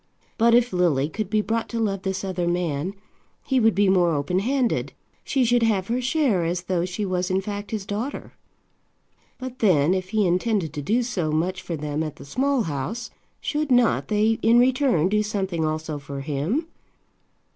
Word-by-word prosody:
But 230 Hz, +1 st, +5 dB
if 245 Hz, -2 st, +3 dB
Lily 160 Hz, -6 st, +2 dB
could 215 Hz, +3 st, -4 dB
be 215 Hz, 0 st, +2 dB
brought 225 Hz, +2 st, -2 dB
to 230 Hz, -, -3 dB
love 200 Hz, -4 st, -1 dB
this 190 Hz, 0 st, -3 dB
other 180 Hz, -2 st, -2 dB
man, 175 Hz, 0 st, -1 dB, 0.5 s
he 265 Hz, -2 st, +1 dB
would 225 Hz, -4 st, +3 dB
be 200 Hz, +1 st, +3 dB
more 175 Hz, -4 st, +3 dB
open 145 Hz, +6 st, 0 dB
handed. 250 Hz, +3 st, 0 dB, 0.3 s
She 265 Hz, -3 st, +1 dB
should 240 Hz, +1 st, +3 dB
have 210 Hz, -4 st, +1 dB
her 245 Hz, +2 st, 0 dB
share 255 Hz, -, +1 dB
as 175 Hz, +2 st, -2 dB
though 180 Hz, -1 st, 0 dB
she 185 Hz, +3 st, -3 dB
was 180 Hz, -1 st, -1 dB
in 185 Hz, 0 st, +2 dB
fact 205 Hz, +1 st, -5 dB
his 215 Hz, -3 st, -4 dB
daughter. 215 Hz, +8 st, -4 dB, 1.0 s
But 255 Hz, -1 st, -7 dB
then, 175 Hz, -6 st, +4 dB
if 185 Hz, -1 st, -2 dB
he 215 Hz, 0 st, +2 dB
intended 180 Hz, -2 st, 0 dB
to 150 Hz, -, -4 dB
do 225 Hz, -, +1 dB
so 185 Hz, -10 st, -2 dB
much 175 Hz, +4 st, -1 dB
for 170 Hz, -, -4 dB
them 150 Hz, 0 st, -3 dB
at 155 Hz, -2 st, -4 dB
the -, -, -12 dB
Small 265 Hz, -, +1 dB
House, 165 Hz, -, -4 dB, 0.3 s
should 300 Hz, -1 st, -1 dB
not 245 Hz, -2 st, +3 dB
they 215 Hz, +1 st, +2 dB
in 230 Hz, +2 st, +5 dB
return 250 Hz, -, +3 dB
do 210 Hz, +2 st, +2 dB
something 195 Hz, -5 st, -2 dB
also 155 Hz, -1 st, -2 dB
for 140 Hz, -1 st, -7 dB
him? 155 Hz, -, -1 dB
195 Hz, 190 wpm, -24 LUFS, 170-230 Hz, 1.0 s, But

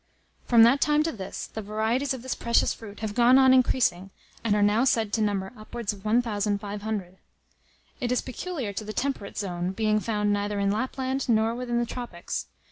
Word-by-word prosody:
From 235 Hz, -2 st, +7 dB
that 255 Hz, +5 st, +5 dB
time 300 Hz, 0 st, +3 dB
to 325 Hz, -, -1 dB
this, 195 Hz, -8 st, -6 dB
the 220 Hz, -, -7 dB
varieties 220 Hz, +6 st, -1 dB
of 260 Hz, -3 st, -3 dB
this 260 Hz, -, -2 dB
precious 235 Hz, 0 st, +2 dB
fruit 210 Hz, -2 st, -11 dB
have 215 Hz, -2 st, -3 dB
gone 245 Hz, +3 st, +5 dB
on 265 Hz, -1 st, +6 dB
increasing, 240 Hz, -7 st, +2 dB, 0.3 s
and 215 Hz, -3 st, +2 dB
are 205 Hz, -, +3 dB
now 210 Hz, +4 st, +3 dB
said 225 Hz, -5 st, +1 dB
to 225 Hz, -, +1 dB
number 200 Hz, -1 st, -1 dB
upwards 215 Hz, 0 st, -5 dB
of 195 Hz, -1 st, -13 dB
1,500. 205 Hz, -3 st, -1 dB, 0.8 s
It 245 Hz, -, -2 dB
is 250 Hz, -, +2 dB
peculiar 260 Hz, -, -5 dB
to 215 Hz, -, -4 dB
the 215 Hz, 0 st, -6 dB
temperate 260 Hz, -7 st, -3 dB
zone, 180 Hz, -2 st, -2 dB
being 215 Hz, +1 st, +1 dB
found 210 Hz, -2 st, 0 dB
neither 205 Hz, 0 st, -1 dB
in 200 Hz, 0 st, +1 dB
Lapland, 260 Hz, +4 st, -2 dB
nor 225 Hz, 0 st, +3 dB
within 240 Hz, 0 st, -2 dB
the 240 Hz, -, +1 dB
tropics. 235 Hz, -8 st, -5 dB
220 Hz, 190 wpm, -26 LUFS, 205-245 Hz, 0.8 s, From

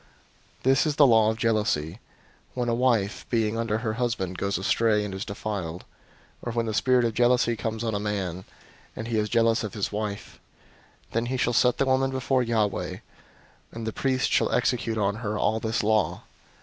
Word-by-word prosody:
005:029 -, -, -27 dB
"This 135 Hz, +2 st, +4 dB
is 150 Hz, -, 0 dB
the 145 Hz, -, +6 dB
law 110 Hz, -4 st, +5 dB
of 110 Hz, -, -2 dB
jealousy, 105 Hz, -6 st, 0 dB, 0.6 s
when 120 Hz, -1 st, -1 dB
a -, -, +1 dB
wife, 115 Hz, -4 st, +1 dB
being 110 Hz, -2 st, +1 dB
under 115 Hz, -2 st, -1 dB
her 110 Hz, -1 st, -2 dB
husband, 115 Hz, -6 st, -2 dB
goes 100 Hz, +1 st, -1 dB
astray, 105 Hz, +2 st, +2 dB
and 100 Hz, -, -5 dB
is 95 Hz, +1 st, -4 dB
defiled; 100 Hz, -5 st, -5 dB, 0.6 s
005:030 -, -, -8 dB
or -, -, -1 dB
when 115 Hz, 0 st, 0 dB
the 110 Hz, -, -2 dB
spirit 125 Hz, +3 st, +3 dB
of 115 Hz, -, 0 dB
jealousy 120 Hz, 0 st, +3 dB
comes 110 Hz, 0 st, -3 dB
on 115 Hz, -1 st, -1 dB
a 100 Hz, -, -1 dB
man, 95 Hz, -4 st, -3 dB, 0.5 s
and 110 Hz, +1 st, -6 dB
he 110 Hz, -2 st, +1 dB
is 105 Hz, 0 st, -1 dB
jealous 115 Hz, +1 st, +2 dB
of 110 Hz, -, -5 dB
his 105 Hz, -, -2 dB
wife; 105 Hz, -1 st, -5 dB, 0.7 s
then 115 Hz, +1 st, -1 dB
he 130 Hz, +1 st, -2 dB
shall 120 Hz, -1 st, +1 dB
set 125 Hz, +1 st, +3 dB
the 135 Hz, -, +2 dB
woman 135 Hz, 0 st, +2 dB
before 130 Hz, 0 st, 0 dB
Yahweh, 110 Hz, -4 st, -1 dB, 0.7 s
and 115 Hz, 0 st, -6 dB
the 110 Hz, -, -3 dB
priest 130 Hz, -1 st, 0 dB
shall -, -, +2 dB
execute 120 Hz, -2 st, 0 dB
on 100 Hz, 0 st, 0 dB
her 110 Hz, -2 st, -3 dB
all 110 Hz, +1 st, +1 dB
this 110 Hz, 0 st, -1 dB
law. 110 Hz, -2 st, +1 dB
110 Hz, 200 wpm, -26 LUFS, 105-120 Hz, 0.7 s, the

